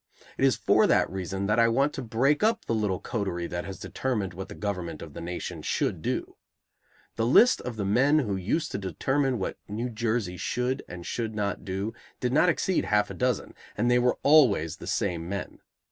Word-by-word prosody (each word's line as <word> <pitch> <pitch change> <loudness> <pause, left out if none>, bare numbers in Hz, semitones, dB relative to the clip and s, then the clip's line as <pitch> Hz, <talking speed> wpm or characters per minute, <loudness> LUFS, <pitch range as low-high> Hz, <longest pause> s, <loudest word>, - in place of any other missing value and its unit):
It - - -2
is 135 -2 +5
for - - +3
that - - +3
reason 95 +1 -3
that 105 +3 +2
I 115 - +6
want 135 +5 +2
to - - -4
break 125 +5 +1
up 225 +1 +2
the - - -1
little 105 -4 0
coterie 95 -6 -3
that 85 0 -4
has 95 -1 -6
determined 105 -9 -2
what 95 +2 -7
the - - -8
government 90 -6 -4
of 80 -3 -10
the - - -7
nation 85 +1 -5
should - - -1
do. - - -3 0.8
The 115 - +1
list 235 - +6
of 125 - -5
the 105 -2 -2
men 130 +9 +4
who 110 -10 0
used 100 - -1
to - - -3
determine 135 +7 0
what 95 - -4
New 115 +4 -3
Jersey 110 -5 -1
should 125 +6 -1
and 85 -1 -8
should 110 -2 -3
not 100 -2 -2
do 100 +3 -3 0.3
did 125 0 -1
not 165 +5 +5
exceed 180 +2 +1
half 105 -1 +2
a - - -5
dozen, 125 -3 -1 0.2
and 120 +3 +2
they 125 - +5
were 125 0 +2
always 120 - +4
the - - -9
same 85 -1 -1
men. 100 0 -5
110 Hz, 205 wpm, -27 LUFS, 95-125 Hz, 0.8 s, I